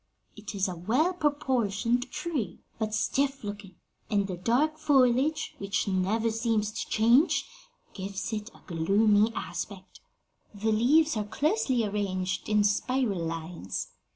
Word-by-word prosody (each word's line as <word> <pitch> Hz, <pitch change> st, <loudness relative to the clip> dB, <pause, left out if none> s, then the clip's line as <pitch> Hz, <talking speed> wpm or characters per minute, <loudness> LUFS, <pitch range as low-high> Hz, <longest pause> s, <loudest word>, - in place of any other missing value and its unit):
It 210 Hz, 0 st, -8 dB
is 195 Hz, -1 st, +1 dB
a 180 Hz, -, -4 dB
well 250 Hz, -, +1 dB
proportioned 250 Hz, -, 0 dB
tree, 285 Hz, -, -4 dB, 0.2 s
but 215 Hz, -1 st, -1 dB
stiff 275 Hz, +4 st, 0 dB
looking, 205 Hz, -2 st, -7 dB, 0.3 s
and 200 Hz, -1 st, +2 dB
the 190 Hz, -2 st, -4 dB
dark 260 Hz, -, +1 dB
foliage, 280 Hz, +2 st, +2 dB
which 200 Hz, +1 st, -1 dB
never 200 Hz, +4 st, +1 dB
seems 220 Hz, -2 st, 0 dB
to -, -, -5 dB
change, 235 Hz, +9 st, +4 dB, 0.5 s
gives 195 Hz, +3 st, -5 dB
it 210 Hz, +1 st, -4 dB
a -, -, -18 dB
gloomy 205 Hz, +5 st, +3 dB
aspect. 195 Hz, -3 st, -6 dB, 0.6 s
The 215 Hz, +2 st, 0 dB
leaves 280 Hz, +7 st, +4 dB
are 210 Hz, -, 0 dB
closely 260 Hz, -, +1 dB
arranged 195 Hz, -3 st, -2 dB
in 210 Hz, -1 st, +4 dB
spiral 210 Hz, -2 st, +1 dB
lines. 165 Hz, -, -4 dB
215 Hz, 130 wpm, -28 LUFS, 200-260 Hz, 0.6 s, change